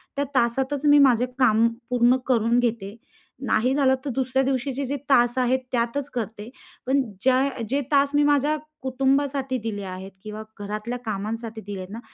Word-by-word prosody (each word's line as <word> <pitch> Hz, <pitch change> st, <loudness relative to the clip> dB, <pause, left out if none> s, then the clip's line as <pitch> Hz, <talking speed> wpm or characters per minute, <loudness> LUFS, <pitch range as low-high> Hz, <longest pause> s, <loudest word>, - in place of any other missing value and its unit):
त्या 285 Hz, 0 st, 0 dB
तासातच 265 Hz, +4 st, 0 dB
मी 290 Hz, 0 st, +7 dB
माझे 245 Hz, +1 st, +2 dB
काम 230 Hz, -2 st, +4 dB, 0.2 s
पूर्ण 245 Hz, +1 st, +4 dB
करून 235 Hz, -1 st, +3 dB
घेते. 225 Hz, -4 st, -2 dB, 0.5 s
नाही 250 Hz, +4 st, +2 dB
झालं 265 Hz, -2 st, +3 dB
तर -, -, -2 dB
दुसऱ्या 265 Hz, 0 st, +1 dB
दिवशीचे 270 Hz, +1 st, -1 dB
जे 280 Hz, +3 st, -2 dB
तास 240 Hz, -1 st, +4 dB
आहेत 255 Hz, +1 st, +2 dB
त्यातच 250 Hz, +4 st, -1 dB
करते. 220 Hz, -1 st, -5 dB, 0.4 s
पण 275 Hz, +2 st, +2 dB, 0.2 s
ज्या 260 Hz, -1 st, +2 dB
जे 280 Hz, +2 st, +1 dB
तास 280 Hz, 0 st, +4 dB
मी 290 Hz, -, +4 dB
माझ्या 290 Hz, +1 st, +2 dB, 0.2 s
कुटुंबासाठी 270 Hz, 0 st, 0 dB
दिले 205 Hz, -3 st, -4 dB
आहेत 190 Hz, +1 st, -7 dB
किंवा 215 Hz, 0 st, -7 dB, 0.2 s
घरातल्या 210 Hz, +4 st, -4 dB
कामांसाठी 220 Hz, +2 st, -4 dB
दिले 200 Hz, -1 st, -7 dB
आहेत 185 Hz, 0 st, -8 dB
ना, 230 Hz, -, -6 dB
250 Hz, 165 wpm, -24 LUFS, 225-270 Hz, 0.5 s, मी